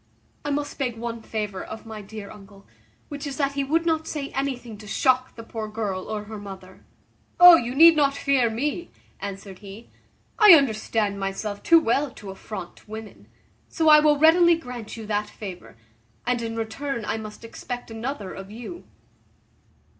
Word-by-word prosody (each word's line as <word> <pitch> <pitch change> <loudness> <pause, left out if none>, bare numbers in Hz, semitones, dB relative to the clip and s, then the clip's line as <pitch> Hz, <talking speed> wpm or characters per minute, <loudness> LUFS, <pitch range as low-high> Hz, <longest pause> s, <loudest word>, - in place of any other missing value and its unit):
I 290 - -3
must 290 0 -3
beg 245 -4 -2
one 230 0 -5
favour 210 -4 -4
of 220 - -9
my 220 -1 -8
dear 205 0 -9
uncle, 200 -1 -15 0.4
which 290 0 -6
is 275 - -5
that 280 -2 +1
he 280 0 -2
would 325 +5 0
not 320 -1 0
say 285 -3 -4
anything 255 -4 -3
to 210 - -11
shock 255 +4 +1
the 230 - -9
poor 225 -1 -6
girl 210 -3 -4
or 215 -1 -4
her 215 0 -8
mother." 190 -2 -11 0.6
"Oh! 355 -1 +11
you 245 -4 -1
need 330 +3 +8
not 280 -2 +2
fear 270 -4 +2
me," 290 +9 -3 0.3
answered 195 -1 -7
he, 205 +3 -12 0.5
"I 420 -6 +10
understand 220 -6 0
myself 200 +1 -4
too 335 -1 +6
well 280 +2 +1
to 205 -5 -10
affront 190 0 -9
women; 220 -1 -9 0.4
so 320 -2 +2
I 305 0 +9
will 300 -1 +4
readily 340 +3 +6
grant 250 -8 -8
you 225 - -7
that 210 0 -2
favour; 185 - -9 0.5
and 245 -1 0
in 225 -1 -4
return 230 +2 -4
I - - -2
must 215 +1 -9
expect 245 +1 -7
another 225 -3 -5
of 195 0 -9
you." 240 +11 -9
230 Hz, 175 wpm, -24 LUFS, 210-280 Hz, 0.6 s, Oh